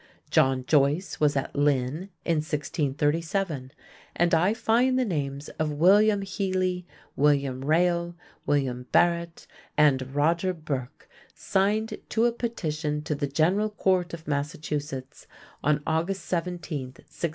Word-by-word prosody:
John 130 -1 +3
Joyce 150 +6 +2
was 150 -1 +3
at 135 - -2
Lynn 145 +4 0 0.2
in 165 -2 +2
1637, 150 +1 -1 0.4
and 175 0 +2
I 175 +5 +4
find 245 +3 +2
the 255 - +2
names 145 -6 -3
of 155 -1 +1
Willyam 200 +7 +4
Heally, 185 -2 -1 0.3
William 140 -2 +2
Reyle, 170 +3 +1 0.3
William 130 -3 0
Barrett, 170 -1 +2 0.3
and 135 -3 +3
Roger 170 +5 +2
Burke 140 -6 -5 0.3
signed 210 +3 0
to 225 +1 +2
a 240 - +3
petition 155 -11 -3
to 150 - -2
the 145 0 -2
General 180 +9 +2
Court 185 -4 0
of 160 -1 -15
Massachusetts 145 -1 -4 0.4
on 150 0 +2
August 170 +5 -1
17, 180 0 -2 0.3
1664. 150 +6 -6
160 Hz, 125 wpm, -26 LUFS, 145-185 Hz, 0.4 s, I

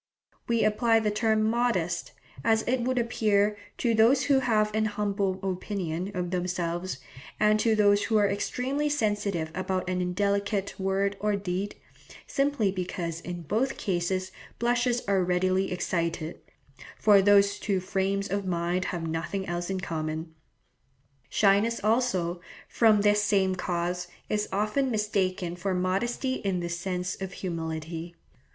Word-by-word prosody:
We 235 -1 +2
apply 225 +1 +3
the 215 -1 0
term 220 0 +2
'modest,' 215 -7 0 0.3
as 220 -1 +3
it 250 +1 0
would 255 +2 0
appear, 210 -3 +2 0.2
to 235 -2 +1
those 235 +5 +5
who 275 -2 +4
have 215 -4 +1
an 220 0 +1
humble 200 -2 -1
opinion 185 -2 -3
of 180 -1 -2
themselves, 180 -2 -2 0.4
and 215 0 +4
to 225 0 +3
those 205 -1 +4
who 220 - +2
are 205 -1 +4
extremely 260 +8 -1
sensitive 205 - -1
about 185 0 -2
an 180 0 0
indelicate 200 +2 -1
word 195 +1 0
or 210 0 +1
deed, 195 0 -3 0.5
simply 275 -8 +1
because 175 -3 -4
in 175 -1 -6
both 225 - 0
cases 185 0 -1 0.3
blushes 245 +1 +1
are 195 -2 +3
readily 185 +2 +1
excited, 170 -2 -2 0.6
for 205 -2 +6
these 200 0 +4
two 195 -3 0
frames 195 +2 -1
of 200 +2 -1
mind 175 0 -1
have 170 -3 -3
nothing 165 +4 -3
else 175 0 -3
in 190 -1 -1
common. 160 -2 -4 1.0
Shyness 210 +3 +3
also, 200 -7 +1 0.3
from 220 -3 +4
this 205 0 +4
same 195 -2 +2
cause, 175 0 -2 0.2
is 210 0 -1
often 210 +7 +1
mistaken 190 -5 -1
for 185 +1 -2
modesty 220 +8 0
in 190 -3 0
the 170 0 -3
sense 180 +2 -3
of 190 -1 -4
humility. 165 -1 -5
195 Hz, 140 wpm, -27 LUFS, 180-215 Hz, 1.0 s, for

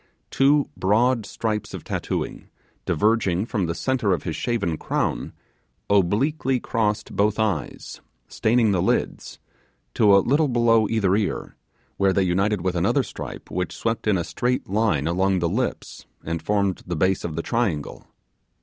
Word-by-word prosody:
Two 140 +1 +3
broad 115 +4 +2
stripes 110 -2 -3
of - - -8
tattooing, - - -4 0.4
diverging 105 -1 +1
from 105 -7 -1
the 85 - -2
centre 125 -5 0
of 85 - -2
his 80 - -3
shaven 105 -9 -1
crown, - - -2 0.6
obliquely 125 - +2
crossed 105 -4 -1
both 105 +1 +2
eyes 100 - -3 0.3
staining 115 -1 +2
the 95 -3 +1
lids - - -1 0.6
to 100 -3 +5
a 100 - +2
little 145 +4 +3
below 115 -3 +3
each 110 -2 0
ear, 100 +2 0 0.4
where 95 -1 +3
they 95 - +2
united 95 +2 +1
with 90 0 -1
another 120 +10 +2
stripe - - -8
which 90 0 -3
swept 115 -1 -2
in 105 -3 +3
a 85 - -1
straight 120 +10 -2
line 100 -8 +1
along 95 +3 +1
the 85 -1 0
lips 120 +9 -3 0.2
and 85 0 -3
formed 100 +1 0
the 90 - -2
base 95 +4 +1
of 80 -3 -4
the 85 - -3
triangle. 100 -12 -2
105 Hz, 155 wpm, -23 LUFS, 90-115 Hz, 0.6 s, to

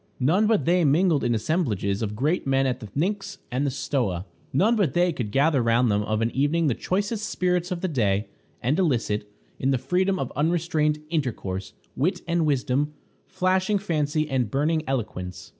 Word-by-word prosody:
None 175 +12 +3
but 220 -2 +2
they 175 +1 +3
mingled 155 +1 +3
in 120 - +2
the - - +1
assemblages 110 - 0
of 105 -1 -2
great 150 - 0
men 135 0 +2
at 130 -1 -1
the 110 - -8
Pnyx 195 - -2 0.2
or 125 - 0
the 140 0 +1
Stoa. 100 - -1 0.3
None 210 - +3
but 195 - +1
they 175 0 +3
could 120 -7 -3
gather 140 +4 +3
round 115 0 +3
them 100 0 +2
of 110 +1 -1
an 115 - 0
evening 145 +5 +1
the 140 - +3
choicest 205 - -2
spirits 180 -1 0
of 180 -2 -3
the 185 - 0
day, 105 - +1 0.4
and 140 +8 +1
elicit, 115 - 0 0.3
in 130 - 0
the 135 - +3
freedom 185 +9 +1
of - - -4
unrestrained 155 -1 +1
intercourse, 105 - -3 0.2
wit 180 +7 0
and 170 -2 +1
wisdom, 145 +1 0 0.3
flashing 190 +2 +1
fancy 155 -5 0
and 130 -6 0
burning 155 +6 +1
eloquence. 90 -9 -4
145 Hz, 185 wpm, -25 LUFS, 120-175 Hz, 0.4 s, None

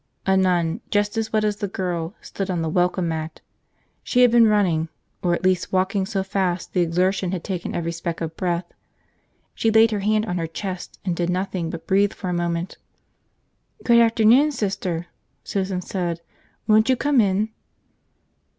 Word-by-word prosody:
A 190 - +3
nun, 180 0 +1
just 205 0 +1
as 225 -1 -2
wet 215 -1 +1
as 210 -1 0
the 205 - -2
girl, 180 -2 -3
stood 195 -1 -5
on 175 -3 -1
the 160 - -1
welcome 180 +1 +1
mat. 160 0 -4 0.6
She 250 0 +3
had 245 - +6
been 235 -1 +6
running, 180 -7 +2 0.3
or 175 -1 +2
at - - -6
least 185 -1 +1
walking 190 +1 +1
so 195 -3 -1
fast 190 -2 -2
the 180 - +2
exertion 180 +2 +1
had 180 - -3
taken 185 -3 -4
every 170 -1 -2
speck 170 0 -4
of 165 -1 -4
breath. 175 -1 -1 0.9
She 225 - +1
laid 225 +1 +5
her 210 - -1
hand 215 +2 +1
on 180 -4 -2
her 165 - -2
chest 185 +2 -6
and 180 -3 0
did 175 0 -1
nothing 180 -2 -2
but 165 - -7
breathe 200 +2 +2
for 185 - -5
a - - -1
moment. 175 0 -2 1.0
"Good 235 -1 +5
afternoon, 230 +5 +5
Sister," 190 - -2 0.4
Susan 190 -2 -2
said. 175 -3 -3 0.5
"Won't 220 +2 +4
you 260 - +5
come 280 -1 +3
in?" 200 +1 +1
190 Hz, 180 wpm, -23 LUFS, 175-210 Hz, 1.0 s, had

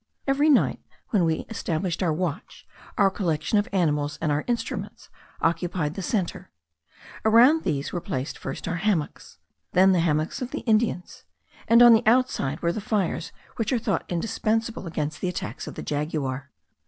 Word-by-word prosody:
Every 285 +3 +3
night, 285 - +3 0.3
when 195 -6 +3
we 160 -1 -1
established 180 -5 -2
our 175 -3 +2
watch, 165 -1 -4 0.3
our 195 -1 +4
collection 175 +1 0
of 205 - -1
animals 150 -6 0
and 155 -2 0
our 145 +1 0
instruments 240 -1 -4 0.3
occupied 165 -2 0
the 195 - -5
centre; 190 -2 -2 0.7
around 240 +9 +6
these 140 0 -2
were 175 - -2
placed 135 -7 -4
first 135 - -6
our 170 - -1
hammocks, 175 -5 -2 0.4
then 190 +1 +6
the 185 - +3
hammocks 155 - 0
of 250 - -3
the - - -5
Indians; 215 -5 0 0.4
and 230 +1 +7
on 240 -1 +9
the 225 - +5
outside 225 - +2
were 170 0 +1
the 215 - -4
fires 200 -5 -1 0.3
which 225 0 -1
are 255 - +2
thought 220 -4 -1
indispensable 220 +3 -1
against 155 -2 -3
the 185 - 0
attacks 130 -10 -5
of - - -7
the - - -6
jaguar. 145 -3 -3
180 Hz, 165 wpm, -25 LUFS, 155-220 Hz, 0.7 s, on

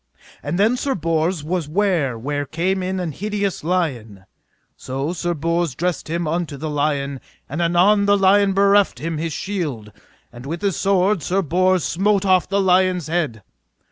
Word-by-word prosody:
And 150 +4 -3
then 220 +5 +3
Sir 270 +1 -1
Bors 165 0 -1
was 165 -1 -2
ware 165 - 0
where 145 +5 -3
came 185 +6 -1
in 185 +1 -2
an 175 -3 -3
hideous 205 +2 -3
lion; 125 - -2 0.5
so 135 +6 -4
Sir 175 -1 -2
Bors 165 -2 -1
dressed 175 0 -2
him 170 +1 -1
unto 160 -2 -2
the 155 +2 -4
lion, 140 -2 -1 0.3
and 155 +5 -4
anon 185 +5 +3
the 205 0 +4
lion 195 0 +4
bereft 200 +1 +3
him 165 0 -4
his 165 0 -2
shield, 150 - -4 0.4
and 120 +2 -10
with 165 +5 -5
his 195 -4 +1
sword 195 -1 +2
Sir 190 +6 0
Bors 185 +2 +2
smote 200 +2 +1
off 185 -2 +3
the 200 +1 +1
lion's 185 -3 +2
head. 155 - -2
175 Hz, 170 wpm, -21 LUFS, 150-190 Hz, 0.5 s, the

